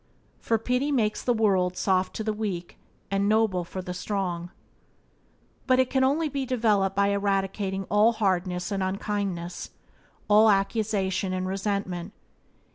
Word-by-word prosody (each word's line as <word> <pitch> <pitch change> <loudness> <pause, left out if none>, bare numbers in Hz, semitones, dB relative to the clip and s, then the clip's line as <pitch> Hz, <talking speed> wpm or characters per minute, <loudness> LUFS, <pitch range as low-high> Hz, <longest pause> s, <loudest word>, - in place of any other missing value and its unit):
"For 225 - +1
pity 250 +6 0
makes 220 -6 +1
the 245 - +1
world 190 -5 +2
Soft 190 -1 +1
to 220 - -3
the 215 0 -1
weak, 195 -5 -4 0.3
and 200 +1 +1
noble 215 -5 +2
for 185 +2 -7
the 180 - -5
strong." 180 -2 -3 1.2
But 255 -1 +4
it 260 -1 +2
can 265 -1 +2
only 295 +5 +2
be 280 -2 -3
developed 215 -6 +1
by 200 0 +3
eradicating 195 -1 -1
all 210 +4 +3
hardness 185 -3 -1
and 195 -1 -1
unkindness, 190 -2 -3 0.6
all 215 +1 +6
accusation 195 -2 0
and 185 0 -2
resentment. 195 -2 -3
200 Hz, 140 wpm, -26 LUFS, 185-220 Hz, 1.2 s, all